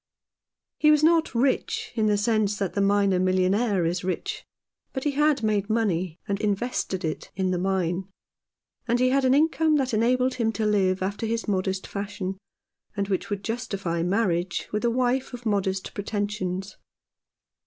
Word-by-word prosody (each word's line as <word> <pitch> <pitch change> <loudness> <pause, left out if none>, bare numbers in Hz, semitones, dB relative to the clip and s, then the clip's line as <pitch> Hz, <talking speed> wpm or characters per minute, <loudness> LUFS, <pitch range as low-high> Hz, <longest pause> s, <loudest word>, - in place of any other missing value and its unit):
He 300 - +5
was 300 0 +5
not 325 -4 +3
rich 435 - 0
in 220 -2 +1
the 210 -1 +3
sense 210 -1 +1
that 195 -3 -2
the 200 - 0
miner 200 -2 +3
millionaire 185 +2 +2
is 175 +2 -1
rich, 405 - -3 0.5
but 265 - -3
he 295 - +1
had 290 -2 +2
made 210 -1 +1
money 185 -7 0
and 200 -1 -2
invested 205 -3 -1
it 155 - -4
in 190 0 0
the 180 - 0
mine, 185 -1 0 0.8
and 240 +1 +2
he 255 0 +4
had 270 0 +2
an 260 +1 +4
income 315 +1 +3
that 265 -4 0
enabled 250 +4 +2
him 230 -3 0
to 220 - -1
live 190 -3 +2
after 205 +4 -2
his 230 +1 -2
modest 190 -1 -1
fashion, 195 -2 -5 0.6
and 200 0 -1
which 190 +3 -1
would 200 -1 -3
justify 195 -7 -2
marriage 180 -1 0
with 210 +2 -2
a 235 - +3
wife 250 +1 0
of 245 0 -12
modest 195 -3 -1
pretensions. 200 -2 -3
205 Hz, 165 wpm, -25 LUFS, 190-245 Hz, 0.8 s, He